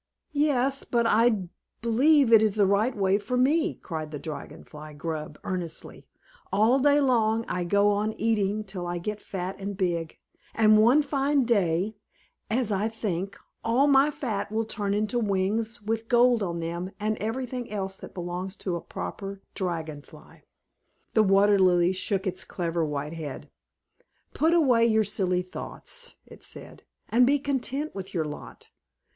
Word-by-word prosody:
"Yes; 275 -2 +1
but 235 -1 0
I 225 -2 +3 0.4
believe 260 +2 +4
it 220 - +9
is 215 -2 +2
the 205 -2 +4
right 205 +5 +1
way 195 0 +2
for 220 +5 -2
me!" 310 +7 +2
cried 155 -3 -6
the 150 - -6
Dragon 150 +1 -8
Fly 150 0 -11
Grub 155 0 -5
earnestly. 180 -4 -5 0.4
"All 220 +7 +4
day 290 +2 +4
long 230 -4 +2
I 180 -1 -2
go 200 +3 +3
on 210 +2 0
eating 215 -2 0
till 190 -3 -6
I 175 0 -2
get 210 +4 -4
fat 185 0 -5
and 200 0 -5
big; 170 -4 -1 0.4
and 215 -1 +5
one 255 +7 +5
fine 275 -1 +1
day, 200 -2 +1 0.5
as 225 -1 0
I 200 +2 +1
think, 200 -4 -3 0.3
all 240 +5 +3
my 280 0 +5
fat 230 -9 -3
will 220 +1 0
turn 205 -2 -2
into 215 +4 0
wings 215 +2 -1
with 225 +1 -2
gold 240 -1 +4
on 170 -3 -2
them, 170 +2 -4
and 215 +1 0
everything 245 +2 -3
else 195 -2 -3
that - - -11
belongs 180 +2 -4
to 185 -4 -3
a 170 - -4
proper 195 -1 -7
Dragon 160 -5 -3
Fly!" - - -17 0.7
The 220 - +5
Water 200 0 +4
Lily 180 -1 +4
shook 195 +1 -2
its 185 -1 -3
clever 170 -2 -2
white 150 0 -3
head, 155 -5 -7 0.8
"Put 325 +2 +3
away 255 -8 +4
your 220 -1 +3
silly 185 -3 0
thoughts," - - -6
it - - -15
said, - - -10 0.2
"and 245 +2 +4
be 285 +2 +4
content 280 +1 -2
with 190 -1 -7
your 160 -2 0
lot. 150 0 -9
210 Hz, 165 wpm, -27 LUFS, 180-235 Hz, 0.8 s, it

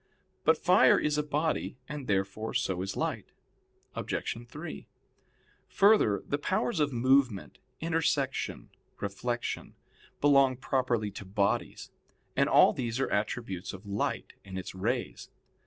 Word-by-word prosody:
But - - +4
fire - - +5
is 150 0 +1
a - - +3
body, 150 -1 -1
and 145 -4 -6
therefore 100 +2 -1
so 90 -1 0
is 95 +1 -4
light. - - -3 0.6
Obj. - - -3
3: 155 +7 -8 0.8
Further, 200 - +4
the 145 - -1
powers 190 +4 0
of 145 -1 +2
movement, 125 -3 +2 0.2
intersection, 160 -5 -1 0.3
reflection, 120 +5 -3 0.4
belong 140 -3 +4
properly 125 -5 0
to 100 - -8
bodies; 100 +1 -1 0.4
and - - +3
all - - +6
these 120 -1 -3
are 135 - 0
attributes 100 -3 -2
of 95 +2 -10
light 100 0 -2
and 95 -1 -7
its 95 - -6
rays. 115 +7 -3
125 Hz, 125 wpm, -30 LUFS, 100-145 Hz, 0.8 s, all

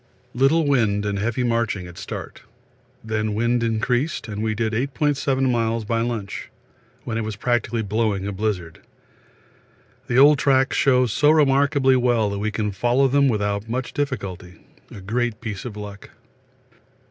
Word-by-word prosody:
Little 135 +6 +3
wind 110 -7 +1
and 100 -1 -2
heavy 115 +4 -1
marching 115 -5 -1
at 90 -1 -11
start. - - -7 0.6
Then 110 -1 -2
wind 120 +2 +1
increased 120 +6 -1
and 105 -1 -5
we 110 -1 -1
did 110 0 -1
8.7 135 +1 0
miles 115 -2 0
by 115 +1 0
lunch, 115 -5 -4 0.5
when 115 -1 -3
it - - -2
was 110 -1 -4
practically 115 0 -1
blowing 105 -2 -1
a 100 - -2
blizzard. 95 -5 -3 1.3
The 120 - 0
old 145 +1 +7
tracks 135 -1 +2
show 125 -2 +3
so 125 +6 +2
remarkably 140 -2 +4
well 120 -4 +2
that 100 - -3
we 105 +1 -1
can 105 -1 -2
follow 120 +7 +2
them 140 +1 +3
without 105 -1 -1
much 125 +2 -3
difficulty 100 - -5 0.2
a 100 - -10
great 115 +3 -2
piece 110 -3 -6
of 110 -4 -7
luck. 105 -1 -9
115 Hz, 155 wpm, -22 LUFS, 105-130 Hz, 1.3 s, old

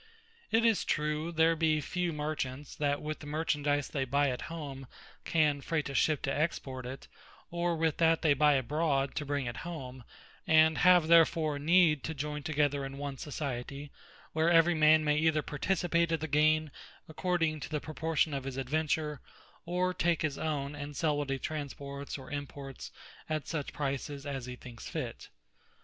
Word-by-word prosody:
It 225 +1 +3
is 225 -3 +3
true, 150 +2 -1
there 165 0 +3
be 155 -1 +2
few 175 +4 -2
Merchants, 150 -2 -4
that 145 -1 0
with 155 0 -4
the 145 - -10
Merchandise 145 -2 0
they 140 - -1
buy 140 +1 +2
at 125 - -4
home, 140 -5 -7 0.4
can 150 -3 +2
fraight 155 -1 -1
a - - -5
Ship, 150 +1 +2
to 135 - -1
export 135 -5 -2
it; 130 +2 -8 0.4
or 170 0 0
with 160 -1 +1
that 165 -1 +3
they 155 -3 +5
buy 150 +1 +4
abroad, 140 +1 0
to 150 - -4
bring 140 -2 -1
it 120 -1 -4
home; 130 -7 -7 0.4
and 160 0 +5
have 180 -3 +6
therefore 160 -3 +4
need 160 -2 +4
to 160 - -4
joyn 150 +1 -4
together 145 -2 +1
in 135 0 -6
one 140 -1 -5
Society; 140 -1 -5 0.4
where 160 +1 +2
every 170 0 +5
man 155 0 +5
may 150 0 +2
either 155 -1 +2
participate 170 +2 0
of 165 - +1
the 160 - -3
gaine, 155 0 +3 0.4
according 165 -1 0
to - - -6
the 155 -1 -1
proportion 155 0 -1
of 135 -1 -3
his 135 -1 -5
adventure; 150 +2 -1 0.5
or 180 +1 0
take 170 -2 +1
his 150 -3 -2
own; 145 -3 -2
and 145 0 -7
sell 155 -3 +1
what 145 -1 -2
he 135 - 0
transports, 140 -1 -5
or 135 - -11
imports, 140 -2 -7 0.4
at 155 -1 -2
such 150 -4 -3
prices 140 0 -3
as 135 -3 -4
he 125 - -6
thinks 120 -2 -10
fit. - - -5
150 Hz, 175 wpm, -31 LUFS, 140-160 Hz, 0.5 s, have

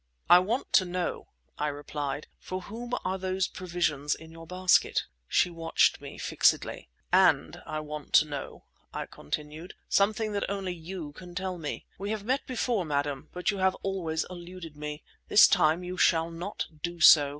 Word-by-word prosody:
"I 175 - +10
want 220 +8 -2
to 190 - +7
know," 180 0 -3 0.3
I 150 - +1
replied, 145 0 -4
"for 185 0 -5
whom 235 +6 -7
are 190 +1 -1
those 185 0 0
provisions 170 -5 -1
in 160 0 -13
your 165 0 -11
basket?" 180 +1 +3 0.2
She 180 - +2
watched 165 -1 +2
me - - -9
fixedly. - - +1 0.2
"And - - +4
I 155 - -3
want 150 -1 -7
to - - +7
know," 145 -2 -7 0.3
I - - -4
continued, 150 - -6
"something 215 +2 +2
that 200 -1 -2
only 195 -2 -2
you 170 -2 -7
can 175 +3 -12
tell 185 -1 -3
me. 150 -2 -5
We 200 +1 -3
have 215 -2 -2
met 260 +5 -1
before, 240 -5 0
madam, 145 -3 -2
but 180 +3 0
you 200 - -5
have 190 0 +3
always 170 -5 -1
eluded 175 -3 -9
me. 150 0 -6 0.2
This - - +8
time 170 -2 +3
you 180 +1 -5
shall 165 -2 +3
not 175 +5 -4 0.2
do 175 0 -4
so. 150 -3 +8
175 Hz, 175 wpm, -28 LUFS, 155-190 Hz, 0.3 s, I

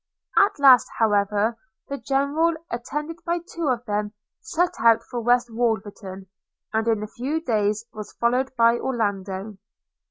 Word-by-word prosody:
At 400 - +4
last 270 -4 +7
however 210 +1 +1 0.3
the 280 0 -5
General, 285 +5 +1 0.2
attended 295 +7 -4
by 340 0 0
two 340 -2 -5
of 245 -2 -1
them, 210 0 -2 0.3
set 360 -5 -1
out 230 0 +4
for 240 - -3
West 240 +1 +2
Wolverton, 210 -4 -3 0.5
and 220 +1 0
in 220 -2 +1
a - - -5
few 270 +9 -3
days 215 -6 0
was 215 -1 -8
followed 250 +3 +1
by 235 0 +4
Orlando. 205 -4 -3
235 Hz, 145 wpm, -24 LUFS, 210-275 Hz, 0.5 s, last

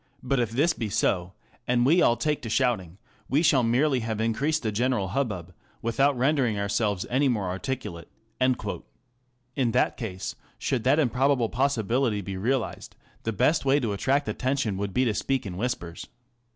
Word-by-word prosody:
But 130 +1 +1
if 120 -3 +1
this 145 +9 +2
be 110 -7 -4
so, 90 -3 0 0.3
and 120 0 +2
we 165 +6 +5
all 120 - +4
take 150 -1 -1
to 115 - -5
shouting, 110 -8 0 0.3
we 145 +5 +2
shall 145 -5 +5
merely 125 +4 +2
have 110 -2 -3
increased 135 +8 0
the 110 - 0
general 115 -3 0
hubbub, 95 -7 -2 0.3
without 135 +4 +2
rendering 130 -4 +2
ourselves 100 -1 0
any 135 +3 +2
more 105 -7 0
articulate." 95 -4 -5 0.3
In 125 0 -3
that 125 - +2
case, 95 -6 -5 0.2
should 125 -3 -2
that 135 +3 +4
improbable 130 -3 +2
possibility 120 -3 +1
be 95 0 -5
realized, 120 +6 -2 0.3
the 115 - -2
best 145 - +2
way 140 +1 +3
to 115 -6 -1
attract 140 +8 +1
attention 130 -5 -1
would 100 0 -3
be 130 +6 +2
to 115 - +1
speak 135 +3 -1
in 95 -3 -5
whispers. 90 -6 -4
120 Hz, 165 wpm, -26 LUFS, 105-135 Hz, 0.3 s, we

